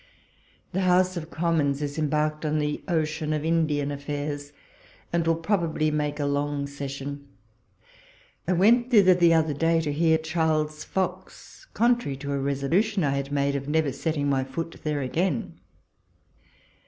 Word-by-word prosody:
The 190 - -1
House 185 0 +3
of 165 -2 -5
Commons 155 -5 0
is 145 +1 -4
embarked 150 0 0
on 155 0 0
the 150 0 -1
ocean 155 -2 -1
of 155 0 -2
Indian 155 -3 +1
affairs, 145 0 -4 0.6
and 170 -1 +1
will 165 0 +2
inobably 165 -4 0
make 150 0 -1
a 145 - 0
long 145 0 -1
session. 140 0 -6 1.2
I 185 - +2
went 235 +7 +4
thither 200 -6 +6
the 170 -2 +4
other 160 -2 +2
day 165 +3 +2
to 150 -2 -2
hear 160 +1 +3
Charles 160 -1 -1
Fox, 190 - -5
contrary 235 - +2
to 140 +1 -4
a 140 - -1
lesolution 165 +10 +1
I 140 - +2
had 140 0 -2
made 140 0 +1
of 140 0 -4
never 155 -2 +1
setting 145 +1 -2
my 135 -2 +1
foot 165 +5 -5
there 150 -2 -1
again. 145 +2 -2
155 Hz, 155 wpm, -26 LUFS, 145-165 Hz, 1.2 s, thither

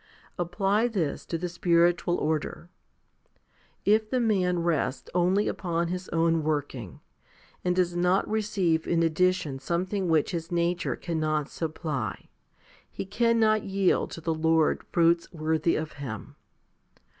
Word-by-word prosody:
Apply 195 +6 +1
this 185 -11 -2
to 165 - -2
the 180 +2 -3
spiritual 175 0 +2
order. 160 +2 -2 1.2
If 215 +1 +3
the 255 - +1
man 185 -7 +1
rests 145 -6 -1
only 180 +4 +2
upon 170 -2 -1
his 180 +1 -4
own 165 0 +2
working, 145 - -3 0.6
and 180 0 +1
does 180 -1 +1
not 180 +2 +2
receive 200 -7 0
in 165 -1 +2
addition 165 -4 +1
something 185 +6 -1
which 160 +1 +2
his 165 -2 -4
nature 175 0 0
cannot 155 -3 -1
supply, 150 - -4 0.6
he - - -6
cannot 220 +1 +2
yield 195 -1 +1
to 165 - -8
the 165 0 0
Lord 160 0 +2
fruits 170 0 +3
worthy 160 0 0
of 155 0 -3
Him. 130 -7 -7
170 Hz, 130 wpm, -27 LUFS, 160-185 Hz, 1.2 s, If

